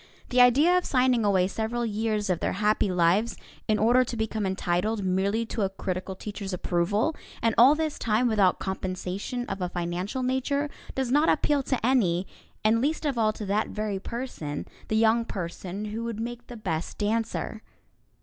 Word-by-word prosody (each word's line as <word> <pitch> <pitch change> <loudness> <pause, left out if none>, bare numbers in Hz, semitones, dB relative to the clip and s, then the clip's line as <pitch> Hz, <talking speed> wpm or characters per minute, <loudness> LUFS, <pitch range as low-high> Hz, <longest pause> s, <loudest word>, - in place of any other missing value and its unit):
The 250 0 +4
idea 285 +9 +6
of - - -8
signing 250 -3 +2
away 190 -3 +3
several 225 +4 -2
years 215 -2 -1
of 175 - 0
their - - -1
happy 210 0 +1
lives 180 +6 +2 0.3
in 215 -2 +3
order 240 +4 +4
to 240 -1 -5
become 220 -2 -1
entitled 190 +3 -1
merely 195 +5 +1
to 225 - -4
a 195 - +1
critical 190 0 -4
teacher's 200 -1 -6
approval, 190 - 0 0.2
and 230 -1 +2
all 260 +6 +7
this 310 -1 -2
time 230 +2 +2
without 205 -5 +3
compensation 190 +5 -4
of 195 - -5
a 180 - -1
financial 175 +8 -3
nature, 280 +3 0 0.2
does 265 -2 -1
not 295 +4 +4
appeal 295 -2 +2
to 260 -3 -1
any, 195 -9 +2 0.4
and 220 +2 +3
least 310 +4 0
of 275 -5 0
all 215 -1 +3
to 215 - -6
that 205 +2 0
very 210 -2 -3
person, 195 - -5 0.2
the 220 - -1
young 225 +1 +4
person 190 0 -5
who 230 +1 -3
would 230 -2 -4
make 240 +1 -5
the 240 - -8
best 170 -6 -3
dancer. 220 +1 -2
220 Hz, 180 wpm, -27 LUFS, 190-245 Hz, 0.4 s, all